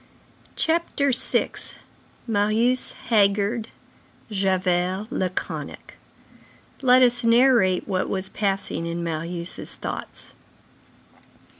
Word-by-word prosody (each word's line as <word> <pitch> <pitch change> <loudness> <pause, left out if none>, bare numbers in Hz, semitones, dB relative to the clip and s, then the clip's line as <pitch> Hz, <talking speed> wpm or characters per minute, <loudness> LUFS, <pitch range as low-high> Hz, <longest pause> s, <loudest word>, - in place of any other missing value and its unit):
CHAPTER 320 -4 +1
VI—MARIUS 230 -1 -1 0.2
HAGGARD, 205 +1 +2 0.6
JAVERT 185 -1 0
LACONIC 185 -9 -4 0.9
Let 255 -1 +6
us 245 -1 +3
narrate 230 -6 +4
what 185 -2 -1
was 190 0 -2
passing 195 -4 -2
in 170 0 -3
Marius' 170 +1 -3
thoughts. - - -7
200 Hz, 70 wpm, -24 LUFS, 185-245 Hz, 0.9 s, Let